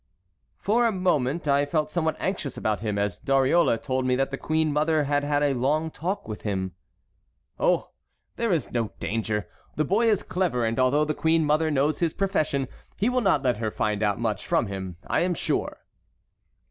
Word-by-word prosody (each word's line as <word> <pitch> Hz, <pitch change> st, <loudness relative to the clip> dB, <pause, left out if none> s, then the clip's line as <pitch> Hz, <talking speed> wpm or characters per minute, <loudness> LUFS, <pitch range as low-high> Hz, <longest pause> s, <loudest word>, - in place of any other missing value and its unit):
"For 235 Hz, +4 st, +2 dB
a -, -, +1 dB
moment 170 Hz, -6 st, 0 dB
I 140 Hz, 0 st, +4 dB
felt 155 Hz, +1 st, -1 dB
somewhat 160 Hz, -2 st, 0 dB
anxious 185 Hz, -8 st, -3 dB
about 110 Hz, -2 st, -1 dB
him, 105 Hz, -2 st, -2 dB
as 100 Hz, -3 st, -1 dB
Dariole 135 Hz, 0 st, +3 dB
told 130 Hz, +2 st, -2 dB
me 125 Hz, 0 st, +2 dB
that 135 Hz, +1 st, 0 dB
the -, -, -1 dB
queen 155 Hz, -1 st, 0 dB
mother 155 Hz, +1 st, +2 dB
had 145 Hz, 0 st, 0 dB
had 145 Hz, 0 st, +1 dB
a 145 Hz, -1 st, +2 dB
long 150 Hz, +6 st, 0 dB
talk 185 Hz, +7 st, -3 dB
with 110 Hz, -1 st, -6 dB
him." 95 Hz, -3 st, -2 dB, 0.9 s
"Oh! -, -, +1 dB, 0.4 s
there 230 Hz, -2 st, 0 dB
is 160 Hz, -8 st, 0 dB
no 115 Hz, -4 st, -2 dB
danger. 105 Hz, -3 st, -2 dB, 0.3 s
The 155 Hz, -, +1 dB
boy 215 Hz, +8 st, +2 dB
is 210 Hz, -, +2 dB
clever, 180 Hz, -10 st, 0 dB
and 115 Hz, +2 st, -1 dB
although 135 Hz, +4 st, +3 dB
the 155 Hz, -, -1 dB
queen 160 Hz, +1 st, +2 dB
mother 155 Hz, +2 st, +2 dB
knows 145 Hz, +1 st, +1 dB
his 170 Hz, -2 st, 0 dB
profession 155 Hz, -9 st, 0 dB, 0.3 s
he 210 Hz, +5 st, +2 dB
will 250 Hz, 0 st, +1 dB
not 185 Hz, -, +2 dB
let 125 Hz, -4 st, +1 dB
her 110 Hz, 0 st, -1 dB
find 105 Hz, 0 st, -1 dB
out 105 Hz, -1 st, +1 dB
much 115 Hz, -3 st, -2 dB
from -, -, +2 dB
him, 95 Hz, -3 st, -5 dB
I -, -, +1 dB
am 175 Hz, 0 st, +1 dB
sure." -, -, -2 dB
145 Hz, 195 wpm, -26 LUFS, 115-165 Hz, 0.9 s, I